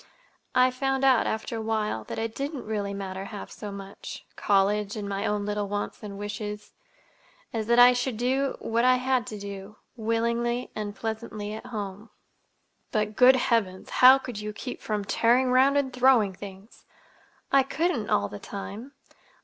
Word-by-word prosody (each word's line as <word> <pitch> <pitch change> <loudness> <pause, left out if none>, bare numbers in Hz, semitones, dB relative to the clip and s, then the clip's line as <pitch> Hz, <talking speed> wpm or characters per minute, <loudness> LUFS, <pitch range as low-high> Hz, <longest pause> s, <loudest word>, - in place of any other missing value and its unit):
—I 255 0 +5
found 270 +1 -1
out, 260 -3 +4
after 220 +1 -3
a - - -3
while, 215 - -1
that - - -6
it 225 0 -2
didn't 280 +1 -4
really 205 -2 -2
matter, 195 -1 -5
half 205 0 -8
so 210 - -7
much—college 200 +1 -1
and 205 -1 -4
my 200 +1 -2
own 205 -1 -1
little 205 0 -2
wants 205 0 -4
and 205 -2 -7
wishes 210 0 -6 0.8
as 220 -2 -2
that 235 0 +3
I 245 +1 +9
should 245 -1 -2
do—what 250 -2 0
I 255 0 +6
had 255 -2 0
to 215 - -6
do, 200 0 -8 0.2
willingly 235 +1 -1
and 205 -1 -4
pleasantly 220 -1 -5
at 220 +3 -8
home." 210 -2 -6 0.8
"But, 215 -1 -1
good 255 +2 +7
Heavens, 225 -7 0
how 255 +1 +8
could 245 -5 -7
you 210 0 -5
keep 250 +4 -7
from 210 -2 -2
tearing 245 +5 +3
'round 265 +3 +5
and 265 -2 0
throwing 250 -6 +4
things?" 195 +2 -11 0.7
"I 275 - +6
couldn't—all 270 - 0
the 105 - -8
time. 210 +6 -7
220 Hz, 160 wpm, -27 LUFS, 205-250 Hz, 0.8 s, I